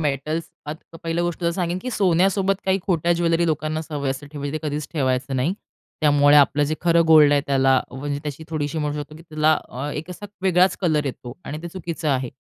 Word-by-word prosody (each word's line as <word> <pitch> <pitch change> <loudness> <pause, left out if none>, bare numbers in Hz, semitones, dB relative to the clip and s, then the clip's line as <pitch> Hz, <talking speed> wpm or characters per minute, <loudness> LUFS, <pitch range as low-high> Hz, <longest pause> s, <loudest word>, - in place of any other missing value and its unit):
Metals 150 +2 -1 0.2
आता 160 +2 -8
पहिल्या 165 +1 -1
गोष्ट 175 0 -3
तर 170 - +1
सांगेन 175 0 -2
की 255 - -4
सोन्यासोबत 195 0 +2
काही 190 0 +2
खोट्या 175 -2 +2
ज्वेलरी 170 0 +1
लोकांना 155 0 -1
सवय 145 -4 -3
असे 135 +2 -5
ठेवायची 145 -1 -4
ते 155 -1 -3
कधीच 145 0 -4
ठेवायचं 130 -2 0
नाही. 145 +9 0 0.5
त्यामुळे 145 -1 +5
आपलं 145 0 +4
जे 155 - 0
खरं 170 0 +4
गोल्ड 155 -2 +7
आहे 145 - +4
त्याला 135 -1 +3
म्हणजे 140 +2 -4
त्याची 150 +1 -6
थोडीशी 155 -1 -2
म्हणू 150 -1 -2
शकतो 150 - -13
की 165 - -13
त्याला 155 -1 +2 0.2
अ, 135 +4 -5
एक 160 +5 -6
असा 205 +3 -8 0.2
वेगळाच 185 0 +3
कलर 155 -5 +1
येतो 125 -2 -6
आणि 150 - -5
ते 170 - -5
चुकीचं 170 -3 -4
आहे. 130 -3 0
155 Hz, 205 wpm, -22 LUFS, 145-170 Hz, 0.5 s, गोल्ड